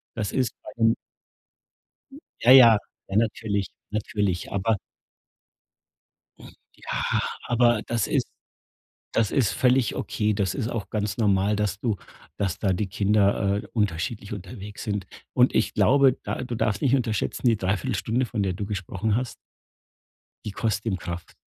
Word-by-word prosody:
das 105 -3 -2
ist 125 -4 0
bei - - -8
ihm 115 0 +5 1.5
Ja, 120 - +4
ja 120 -4 +9 0.3
natürlich, 105 -1 0 0.2
natürlich, 105 -4 -1
aber 100 +2 +1 2.1
Ja, - - 0 0.3
aber 120 -2 +3
das 115 -4 -1
ist - - 0 0.9
das 115 -3 +1
ist 130 -8 +2
völlig 125 -2 +2
okay. 105 -1 -1
Das 100 -2 0
ist 120 -5 -2
auch 115 -4 -4
ganz 105 -2 -2
normal, 100 -1 +2
dass 105 -1 -1
du 110 -5 0 0.4
dass 100 -1 -1
da 100 -3 +2
die 100 +3 -1
Kinder, 100 0 +2
äh, - - -10
unterschiedlich 100 0 -2
unterwegs 100 +1 -8
sind 100 -4 -2 0.3
und - - +4
ich - - +1
glaube, 135 -1 +4
da - - -3
du 125 -2 -4
darfst 105 -2 0
nicht 135 -2 +3
unterschätzen, 120 -1 -1
die 115 - +4
Dreiviertelstunde, 100 +5 -1
von 110 -2 -2
der 95 -2 0
du 100 +3 -4
gesprochen 100 +1 -2
hast 125 0 -2 1.1
die 105 - -3
kostet 110 0 -1
ihm 95 -4 0
Kraft. 85 -1 -7
105 Hz, 140 wpm, -25 LUFS, 100-115 Hz, 2.1 s, ja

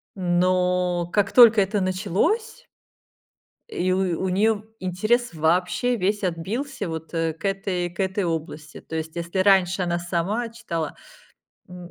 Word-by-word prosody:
Но 180 -1 +1
как 205 -1 +1
только 230 -4 +7
это 195 +1 0
началось 200 - -1 1.0
и 185 +1 0
у 185 -2 0
у 190 - 0
нее 210 +3 +1 0.2
интерес 215 +6 0
вообще 180 +10 +1
весь 205 0 -1
отбился 200 - -3
вот, 160 +1 -7
э, 165 -1 0
к 165 - -11
этой 195 -2 -1
к 170 - -20
этой 190 +1 0
области. 160 -2 -5
То 160 - -8
есть, 160 +1 -4
если 170 +2 -3
раньше 190 -1 +3
она 175 0 -1
сама 185 +7 -2
читала, 170 -9 -5 0.7
м 180 -1 -10
185 Hz, 140 wpm, -24 LUFS, 175-205 Hz, 1.0 s, только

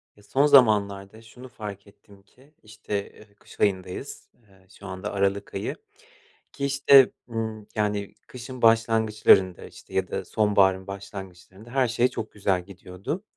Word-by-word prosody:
Ya 105 - -21
son 140 +6 +2
zamanlarda 105 -6 +3
şunu 125 +3 -13
fark 105 -2 -9
ettim 100 0 -20
ki 130 +8 -25
işte, 105 -1 -5
eee, 105 -1 -19
kış - - -18
ayındayız. 95 -3 -2 0.2
Eee, 95 -1 -24
şu 100 - -10
anda 95 +2 -6
aralık 100 0 -1
ayı 100 +2 -3 0.8
ki 140 - -4
işte, 140 -1 +6 0.2
ımm, 110 -2 -5
yani 105 -2 -2
kışın 125 0 -9
başlangıçlarında, 110 -5 +3
işte, - - -15
ya - - 0
da - - -4
sonbaharın 95 -3 +2
başlangıçlarında 100 +1 -10
her 130 0 +1
şey 120 +2 +2
çok 115 -4 -6
güzel 95 -3 -1
gidiyordu. 100 - -7
105 Hz, 145 wpm, -25 LUFS, 100-115 Hz, 0.8 s, işte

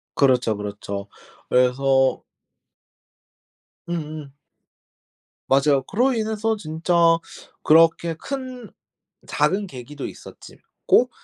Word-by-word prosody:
그렇죠, 125 -5 +2
그렇죠. 100 -1 -6 0.4
그래서 130 +1 +2 1.7
음음. 155 -4 -5 1.1
맞아요. 135 0 +3
그로 245 - +1
인해서 220 -1 -1
진짜 160 -1 -3 0.7
그렇게 165 +1 +4
큰 255 - -7 0.6
작은 200 +1 0
계기도 135 -1 -8
있었지 - - -13 0.3
고 - - +4
155 Hz, 180 characters per minute, -22 LUFS, 130-200 Hz, 1.7 s, 그렇게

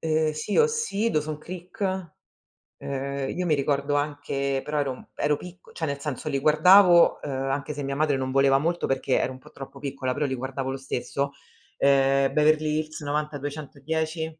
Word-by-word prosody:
Ehm 155 -1 +1
sì 155 +7 -3
OC, 460 - +2
Dawson's 155 -2 -1
Creek 185 +1 -4 0.7
ehm, 140 0 -4
io 180 - -1
mi 160 -3 +3
ricordo 140 0 0
anche 145 -2 -1
però 150 0 -2
ero 140 -2 0
mhmm, 125 - -13
ero 145 0 +1
picco 180 +2 -12
cioè 165 - -4
nel 140 -2 -3
senso 150 +1 -4
li 140 -2 0
guardavo, 175 +4 +6
uhm - - -4
anche 135 +2 -2
se 145 0 -5
mia 140 0 -3
madre 145 -1 +1
non 130 0 -2
voleva 135 0 +4
molto, 170 +5 -1
perché 135 0 +1
ero - - -1
un 130 - -10
po' 150 +3 -17
troppo 135 0 -10
piccola, 135 -2 -3
però 150 - -1
li 130 -2 -1
guardavo 130 +1 -4
lo 135 - -4
stesso, 135 +1 -3 0.5
ehm, 135 0 +3
Beverly 155 0 +3
Hills 155 0 -5
90210 150 +2 -3
145 Hz, 180 wpm, -25 LUFS, 135-155 Hz, 0.7 s, guardavo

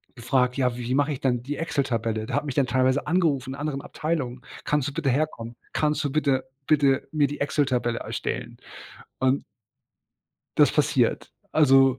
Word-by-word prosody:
gefragt: 125 +1 +1
„Ja 125 -2 +1
wie 125 +1 -3
mache 145 +1 +2
ich 130 - -7
denn 125 -3 +1
die 145 +2 -4
Excel-Tabelle?“ 115 -8 -1
Der - - -3
hat 145 +1 0
mich 140 - -4
dann 135 -3 +2
teilweise 130 +2 +2
angerufen, 150 -7 +1
in - - -5
anderen 145 -2 -2
Abteilungen, 140 -7 -3 0.2
„kannst 145 -3 +1
du - - -10
bitte 150 -4 0
herkommen? 120 -4 -1 0.2
Kannst 150 0 +1
du 140 - -1
bitte 140 -3 +1 0.2
bitte 140 -3 +3
mir 150 -2 +3
die 145 - -6
Excel-Tabelle 130 -5 0
erstellen?“ - - -4 0.6
Und 130 +1 +2 1.1
Das - - +5
passiert, - - +1 0.2
also 135 -3 +5
135 Hz, 165 wpm, -25 LUFS, 125-145 Hz, 1.1 s, Das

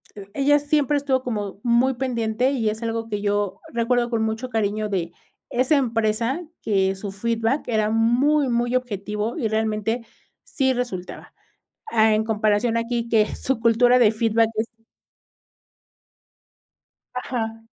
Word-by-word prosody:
eh, 200 -2 -10
ella 290 +1 +3
siempre 290 -1 +1
estuvo 265 -2 0
como, 205 -4 -4
muy 245 +2 +3
pendiente 240 -1 0
y 230 -6 0
es 220 +2 -5
algo 225 0 -2
que 205 -1 -3
yo, 205 -1 -1
recuerdo 240 +1 +1
con 230 -2 0
mucho 220 +3 -2
cariño 215 -1 -1
de 175 -4 -2 0.4
esa 255 +5 +2
empresa, 230 +3 0 0.2
que 195 -2 +1
su 195 0 -5
feedback 230 +6 -1
era 215 -2 +1
muy, 250 +6 +3
muy 240 +1 0
objetivo 210 - -2
y 235 -7 0
realmente 220 +1 -1 0.4
sí 265 -3 0
resultaba. 215 -8 -5 0.6
Ah, 220 -1 +4
en 215 - +1
comparación 220 +1 +1
aquí 235 0 -2
que 215 -2 +3
su 265 -3 -1
cultura 245 +2 +4
de 220 -3 +5
feedback 225 0 +2
es 220 +1 -1 2.5
Ajá. 225 -3 -4
230 Hz, 140 wpm, -23 LUFS, 215-250 Hz, 2.5 s, de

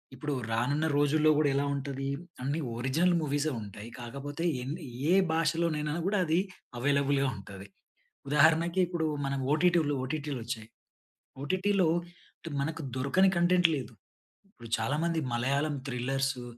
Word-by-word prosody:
ఇప్పుడు 145 +3 -3 0.2
రానున్న, 140 +7 +1
రోజుల్లో 150 +2 +4
కూడా 150 -2 +3
ఎలా 140 - +2
ఉంటది? 135 -1 -3 0.3
అన్నీ 140 +5 -1 0.2
ఒరిజినల్ 155 +9 +2
మూవీసే 145 +1 0
ఉంటాయి. 105 +2 -9
కాకపోతే 140 +6 -6 0.2
ఎన్ని 150 +7 -5 0.3
ఏ - - +6 0.2
భాషలోనైనా 160 -2 0
కూడా 205 +1 +1
అది, 165 +2 +2 0.4
అవైలబుల్‌గా 140 +1 +2
ఉంటది. 95 0 -10 0.6
ఉదాహరణకి 160 +5 +4
ఇప్పుడు 170 -2 -1 0.2
మన 135 0 -1 0.2
ఓటిటి 170 +2 +4 0.2
ఓటిటిలు 145 +1 -3
వచ్చాయి. 110 -2 -5 0.7
ఓటిటిలో, 185 +3 +2 0.7
మనకు 160 +2 -3
దొరకని 140 +9 +3
కంటెంట్ 175 0 +4
లేదు. 130 -3 -6 0.6
ఇప్పుడు 120 - -12
చాలా 120 +7 0
మంది, 170 -1 0 0.2
మలయాళం 140 +5 0
థ్రిల్లర్సు 135 +1 -1
145 Hz, 125 wpm, -30 LUFS, 135-165 Hz, 0.7 s, ఏ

